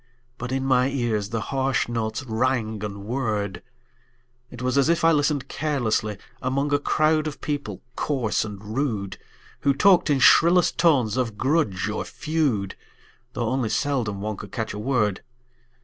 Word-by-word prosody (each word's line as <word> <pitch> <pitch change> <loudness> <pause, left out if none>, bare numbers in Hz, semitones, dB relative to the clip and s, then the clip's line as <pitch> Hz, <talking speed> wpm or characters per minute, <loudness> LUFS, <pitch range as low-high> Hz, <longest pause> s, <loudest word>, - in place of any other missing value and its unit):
But 125 +1 -5
in 135 0 -1
my 130 0 +3
ears 115 -7 -1
the 115 - -2
harsh 135 -1 +1
notes 115 +2 -2
rang 115 -3 -1
and 100 -1 -5
whirred; 110 -5 -2 0.9
It 120 - -11
was 125 +1 -1
as 140 +2 +3
if 170 0 +2
I 165 - +6
listened 145 -3 +1
carelessly 120 -10 -1 0.2
Among 140 +3 0
a 145 - +3
crowd 155 +1 +2
of 150 - -6
people 145 -10 -4
coarse 130 -7 0
and 105 0 -7
rude, 110 -9 -2 0.4
Who 140 -1 +2
talked 180 +2 +4
in 145 - +3
shrillest 170 +6 +5
tones 130 -10 +3
of 115 -5 -1
grudge 130 - +1
or 110 - -2
feud, 145 - -1 0.6
Though 120 -2 -1
only 130 -3 0
seldom 120 -9 -1
one 105 0 -3
could - - -9
catch 110 -3 -3
a 105 - -6
word. 105 -5 0
125 Hz, 160 wpm, -24 LUFS, 110-145 Hz, 0.9 s, I